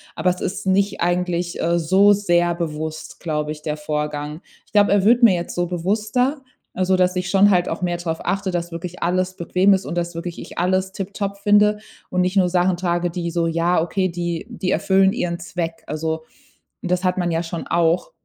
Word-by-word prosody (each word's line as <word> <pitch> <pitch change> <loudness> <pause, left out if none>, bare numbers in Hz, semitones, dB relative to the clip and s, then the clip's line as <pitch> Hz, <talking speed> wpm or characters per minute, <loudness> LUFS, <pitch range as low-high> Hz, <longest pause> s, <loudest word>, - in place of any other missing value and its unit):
Aber 185 - +1
es 180 - -6
ist 195 - -3
nicht 195 +1 +1
eigentlich, 175 0 -1
äh, 170 +1 +2
so 190 +5 +5
sehr 175 -4 +2
bewusst, 155 -2 -5
glaube 150 -2 -2
ich, 150 0 -7
der 150 0 -3
Vorgang. 150 +1 -3 0.2
Ich - - -30
glaube, 205 -1 +4
er 200 -1 +3
wird 240 +3 +5
mir 225 -5 +8
jetzt 170 0 -4
so 175 0 0
bewusster, 215 - 0 0.3
also, 185 0 +1
dass 180 0 +2
ich 180 0 -2
schon 200 +1 +5
halt 180 -2 +2
auch - - -4
mehr 175 -1 0
drauf 165 -2 -3
achte, 195 +1 -1
dass 175 -1 -3
wirklich 170 +1 -7
alles 185 +2 0
bequem 185 +3 +3
ist 190 0 0
und - - -4
dass 170 0 -2
wirklich 170 0 -5
ich - - -11
alles 185 +2 +1
tiptop 200 +1 -4
finde 210 +1 +4 0.3
und 180 - 0
nicht 180 +2 0
nur 185 -2 +4
Sachen 180 0 +2
trage, 175 -1 0
die 170 0 -3
so 170 0 0
ja, 170 +2 +1
okay, 185 +3 0
die 170 0 -3
die 190 -6 -3
erfüllen 190 0 +3
ihren 170 -1 -2
Zweck. 170 -2 -5
Also, 160 +1 -3 0.6
das 180 0 -1
hat 185 0 +1
man 175 -1 0
ja 165 0 0
schon 165 0 -6
auch 170 - +1
180 Hz, 205 wpm, -21 LUFS, 170-190 Hz, 0.6 s, mir